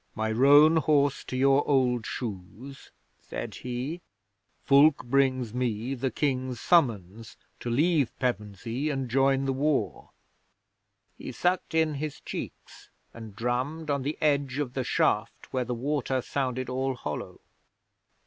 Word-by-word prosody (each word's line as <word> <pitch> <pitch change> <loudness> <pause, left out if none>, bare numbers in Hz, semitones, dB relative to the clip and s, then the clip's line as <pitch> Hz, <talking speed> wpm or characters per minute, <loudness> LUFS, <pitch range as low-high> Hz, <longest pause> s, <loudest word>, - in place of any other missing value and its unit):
My 110 0 -1
roan 145 +7 +6
horse 145 -3 +2
to 130 - -4
your 135 +1 +4
old 125 -4 +2
shoes," 115 +5 -7 0.3
said - - -6
he, 125 +8 -5 0.6
"Fulke 140 +2 +5
brings 130 -3 +1
me 120 0 -2
the 135 0 -2
King's 130 -3 -2
Summons 115 - +1 0.2
to 120 - -5
leave 145 +2 +2
Pevensey 115 +3 -3
and 135 -3 -2
join 135 +2 +2
the 135 - 0
war." 145 +2 -1 1.1
He - - -6
sucked 180 -2 -1
in 160 -1 +2
his 150 +1 -5
cheeks - - -8 0.2
and 110 -3 -10
drummed 130 +8 -2
on 140 -1 0
the 145 +4 -3
edge 140 -3 +1
of 140 -4 -3
the 130 - -2
shaft, - - -1
where 130 -1 0
the 125 - -3
water 135 +1 -1
sounded 130 -2 -2
all 130 +1 -2
hollow. 75 -11 -6
130 Hz, 135 wpm, -27 LUFS, 120-145 Hz, 1.1 s, roan